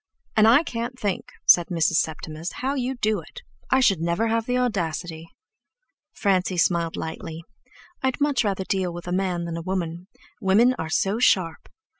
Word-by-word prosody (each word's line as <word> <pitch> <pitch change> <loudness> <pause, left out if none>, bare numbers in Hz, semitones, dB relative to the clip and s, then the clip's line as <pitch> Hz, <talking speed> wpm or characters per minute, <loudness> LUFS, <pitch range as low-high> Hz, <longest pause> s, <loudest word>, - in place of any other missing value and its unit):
"And 215 0 +6
I 250 +8 +6
can't 240 -2 -4
think," 200 -3 -3
said 175 -1 +6
Mrs. 165 -2 +1
Septimus, 160 +1 -4
"how 270 +2 +1
you 265 -1 -2
do 215 -4 0
it. 165 - -12 0.3
I 265 - +4
should 195 -9 +4
never 170 +7 0
have 230 0 0
the 250 0 +1
audacity!" 170 -8 -2 0.8
Francie 185 -2 0
smiled 170 -1 +1
lightly. 160 0 -6 0.6
"I'd 260 +1 -1
much 285 -4 +2
rather 195 -2 -1
deal 185 -2 -1
with 175 +1 -8
a - - -3
man 180 -2 -1
than 170 -1 -4
a - - -4
woman. 175 -1 -4 0.3
Women 220 +7 +4
are 160 - -3
so 195 +6 0
sharp!" 180 -9 +2
190 Hz, 170 wpm, -24 LUFS, 170-230 Hz, 0.8 s, And